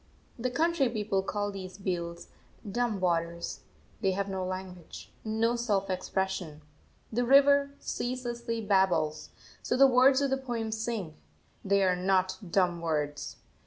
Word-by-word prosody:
The 255 +2 0
country 315 0 +2
people 210 -4 0
call 205 +1 -2
these 190 -1 -8
beels 170 -3 -3 0.4
"dumb 225 0 -1
waters" 170 -5 -1 0.4
they 190 - +2
have 200 +1 -1
no 190 -1 -2
language, 185 -2 -7
no 225 +2 +1
self 205 -5 0
expression. 185 -4 -2 0.5
The 245 +2 +1
river 280 +2 +5
ceaselessly 240 -2 -3
babbles; 190 -7 +1 0.3
so - - -1
the 275 - +8
words 260 +1 +6
of 280 -1 0
the 270 - +2
poem 240 -4 -3
sing, 220 -6 -3 0.5
they 200 0 +3
are 185 -1 +3
not 185 0 +1
"dumb 175 -3 +2
words." 150 -3 -2
200 Hz, 135 wpm, -29 LUFS, 185-240 Hz, 0.5 s, the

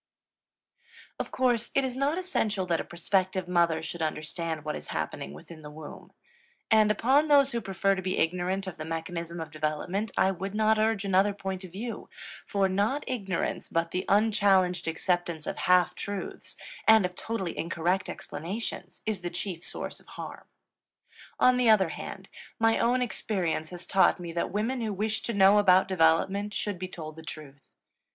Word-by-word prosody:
Of - - -3
course 245 -3 +1
it 275 - +3
is 255 -1 -3
not 280 +5 +1
essential 220 - -1
that 170 -2 +1
a - - -2
prospective 185 +1 -1
mother 170 -3 +2
should 170 +1 -5
understand 155 0 -3
what 150 - -2
is - - -7
happening 70 - -4
within 155 - -11
the 150 - -9
womb. 150 0 -10 0.6
And 215 -1 +6
upon 265 +8 +3
those 280 -2 +5
who 235 - -1
prefer 195 0 +1
to 190 - -3
be 185 0 -2
ignorant 180 +3 0
of 190 -3 -6
the 155 - -5
mechanism 165 +1 -4
of 160 -1 -6
development 155 +7 -2
I 190 - +4
would 195 +2 -5
not 220 0 +3
urge 215 -2 +1
another 195 +1 +3
point 190 -1 -4
of 185 - -9
view, 225 +6 -6 0.4
for 200 -2 +2
not 205 +9 0
ignorance 195 -9 -2
but 165 0 0
the 185 - -1
unchallenged 200 -4 +3
acceptance 170 -1 -1
of - - -4
"half 180 -1 +5
truths" 200 -1 -5 0.3
and 220 -3 +7
of 180 - -3
totally 190 -2 -4
incorrect 175 +4 -1
explanations 180 +2 -6
is 215 -4 -2
the 175 - -3
chief 175 -1 -5
source - - -3
of - - -19
harm. - - -8 0.9
On 255 0 +5
the 245 -2 +4
other 195 -5 +5
hand, 190 +4 -7 0.3
my 225 0 +3
own 250 +2 +3
experience 180 -9 -2
has 180 -1 -8
taught 190 0 +4
me 170 -1 -6
that 170 - -1
women 225 +6 -1
who 220 -2 -1
wish 210 +2 -1
to 235 - -3
know 200 +1 +6
about 190 -2 +5
development 190 +4 +2
should 205 -4 -2
be 185 - -3
told 155 -3 -8
the - - -8
truth. 150 -3 -9
190 Hz, 175 wpm, -28 LUFS, 170-215 Hz, 0.9 s, and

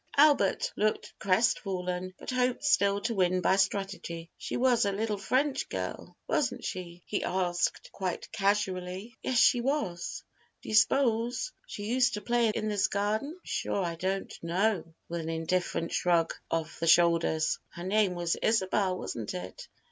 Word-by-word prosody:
Albert 305 - +4
looked 215 0 0
crestfallen, 185 -3 0
but - - -6
hoped 255 0 0
still 200 -10 +3
to 230 - -1
win 185 -2 +2
by 185 +1 +3
strategy. 190 -4 -2
"She - - -4
was 245 -2 +3
a 200 - +1
little 210 +1 -2
French 265 +6 0
girl, - - -5
wasn't - - 0
she?" 175 -1 -6
he 205 - -2
asked, 180 -2 -1
quite 185 -3 -4
casually. 195 +1 -1
"Yes, 255 - 0
she 240 +1 +5
was." 235 - -2 0.4
"Do - - -8
you - - -3
s'pose 235 - +3 0.2
she 205 - -6
used 240 +1 +2
to 210 - -5
play 235 +1 +2
in 215 0 -2
this 205 -2 +2
garden?" 210 +7 -1
"I'm 365 - -17
sure 195 - -1
I 170 - -2
don't 190 +3 -2
know," 175 0 0 0.2
with 170 0 -3
an 160 - -5
indifferent 165 +1 -1
shrug 170 -2 +2 0.2
of 165 -1 -2
the 165 - -1
shoulders. 165 -2 +4
"Her 175 - -9
name 195 -1 +2
was 175 -1 0
Isabel, 190 -3 +1
wasn't 115 - -5
it?" 90 +1 -7
195 Hz, 160 wpm, -29 LUFS, 175-225 Hz, 0.4 s, she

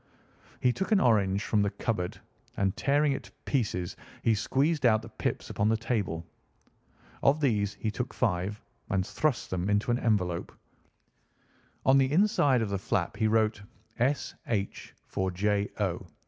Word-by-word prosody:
He 125 -1 +3
took 190 - -3
an 210 - +5
orange 100 - +3
from 105 - +2
the 100 - +2
cupboard, 100 -3 -3 0.4
and 95 -1 +1
tearing 145 +1 +2
it 135 - -3
to - - -15
pieces 100 -10 -1 0.3
he 115 - +4
squeezed 135 +8 +1
out 110 -3 +4
the 115 - -9
pips - - -3
upon 105 +1 +1
the 110 - +3
table. 105 -8 -2 1.0
Of 140 +3 +4
these 105 -8 +1
he 110 - -2
took 125 +3 -3
five 100 -2 -1 0.3
and 95 -3 +1
thrust 155 +2 -1
them 95 +1 -1
into 105 +3 +2
an 120 - +1
envelope. 90 -6 0 1.3
On 135 +1 +6
the 135 0 +2
inside 150 - +3
of 105 - -3
the 100 -1 -1
flap 95 -1 -1
he 110 0 +2
wrote 110 -1 +2 0.4
"S. 135 +4 +1
H. 100 -4 -3
for 95 -1 -2
J. 100 +2 0
O." 95 -2 -1
110 Hz, 160 wpm, -29 LUFS, 100-130 Hz, 1.3 s, On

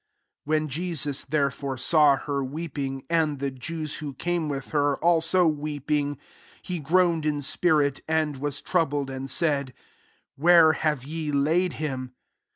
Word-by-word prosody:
33 - - -11
When 155 - -4
Jesus, 150 -2 -2
therefen 140 -2 -1
saw 145 0 +4
her 140 0 -3
weeping, 135 -2 -5
and 160 -3 +1
the 140 0 -2
leu 155 +5 -5
who 145 -3 -6
came 170 0 -1
with 135 -2 -5
her, 145 -1 +2
a/«o 170 +2 +3
weef 155 -4 +1
ing, 145 -1 0 0.5
he 180 -2 -4
groaned 165 +1 +2
in 150 -1 0
spirit, 145 -1 +1
to 160 -1 +1
was 145 0 -4
troubled, 145 -6 0
34 135 - -5
and 135 +1 -5
s^ 140 -4 0 0.3
" - - -39
Where 165 +1 +6
have 155 -4 -1
ye 155 +1 -4
laid 160 +6 +1
him? 130 -4 -5
150 Hz, 160 wpm, -25 LUFS, 140-160 Hz, 0.5 s, Where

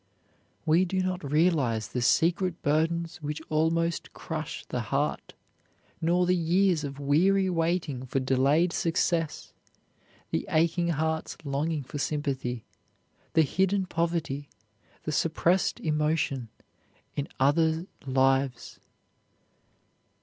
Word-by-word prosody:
We 160 +3 +4
do 185 +1 0
not 185 -1 -2
realize 150 -9 +2
the 125 - -2
secret 170 +8 +2
burdens 165 +3 0
which 150 -1 -4
almost 165 +2 0
crush - - -5
the - - -3
heart, - - -2 0.7
nor 175 +2 +3
the 180 +1 +3
years 175 0 +2
of 140 -1 -5
weary 185 +7 +3
waiting 165 -6 -1
for 135 - 0
delayed 135 +7 +2
success 165 -2 0 0.8
the - - -1
aching 170 +2 +2
hearts 160 0 -1
longing 145 +2 -1
for 145 +3 -7
sympathy, 135 -5 -2 0.7
the 160 - +5
hidden 190 +6 +1
poverty, 165 -5 -2 0.5
the 155 - -3
suppressed 165 +4 +1
emotion 150 -5 0 0.7
in 145 - -2
other 160 +4 +3 0.2
lives. 135 -1 +1
160 Hz, 105 wpm, -28 LUFS, 140-170 Hz, 0.8 s, the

